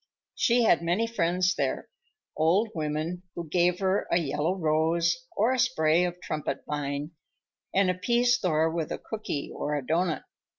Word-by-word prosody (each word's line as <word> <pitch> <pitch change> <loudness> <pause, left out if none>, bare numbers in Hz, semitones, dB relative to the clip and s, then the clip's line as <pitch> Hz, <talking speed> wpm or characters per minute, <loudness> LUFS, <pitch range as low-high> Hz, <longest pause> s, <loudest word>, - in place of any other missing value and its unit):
She 240 -1 +3
had 170 -7 +4
many 175 +7 +1
friends 185 -4 +1
there, - - -2 0.5
old 180 +8 +2
women 155 +2 -3
who 170 -1 -5
gave 175 +3 +2
her 190 +1 +1
a - - +4
yellow 155 +2 0
rose 165 0 +2 0.2
or 225 +5 +3
a 260 - -1
spray 175 -9 +3
of 175 0 -4
trumpet 155 -2 -3
vine 145 +1 -3 0.6
and 190 -1 +3
appeased 240 +6 +2
Thor 160 -3 +2
with 165 -2 -3
a - - -2
cooky 215 -10 -5
or 150 0 -2
a 140 -3 -3
doughnut. 165 +2 0
170 Hz, 160 wpm, -27 LUFS, 155-190 Hz, 0.6 s, had